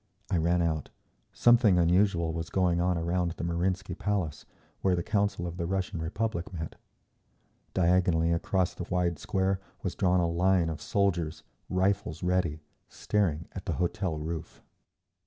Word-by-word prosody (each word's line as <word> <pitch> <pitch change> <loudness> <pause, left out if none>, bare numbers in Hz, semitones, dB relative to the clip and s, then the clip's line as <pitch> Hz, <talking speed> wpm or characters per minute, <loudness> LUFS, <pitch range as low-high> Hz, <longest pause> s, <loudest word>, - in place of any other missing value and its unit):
I 90 - +3
ran 85 +2 +2
out. 80 -4 -1 0.4
Something 120 -6 +5
unusual 85 -1 +3
was 80 0 -4
going 90 -2 +2
on 90 0 +1
around 85 +1 0
the 85 - -7
Marinsky 90 +2 -1
Palace, 90 -6 -2 0.3
where 95 -2 +3
the 85 - -2
Council 100 -3 0
of 85 0 -5
the 85 -2 -2
Russian 95 -3 -2
Republic 100 +2 -2
met. 80 -3 -5 1.0
Diagonally 85 -2 +3
across 90 +2 0
the 90 - -6
wide 90 -3 0
square 95 +2 0 0.2
was 95 - -2
drawn 90 -1 +2
a 85 - +2
line 90 0 +2
of 80 -2 -5
soldiers, 85 -6 0 0.3
rifles 95 +2 0
ready, 90 -4 0 0.3
staring 85 -7 -1
at - - -8
the - - 0
hotel 90 -1 -1
roof. 80 +1 -6
90 Hz, 150 wpm, -29 LUFS, 85-95 Hz, 1.0 s, Something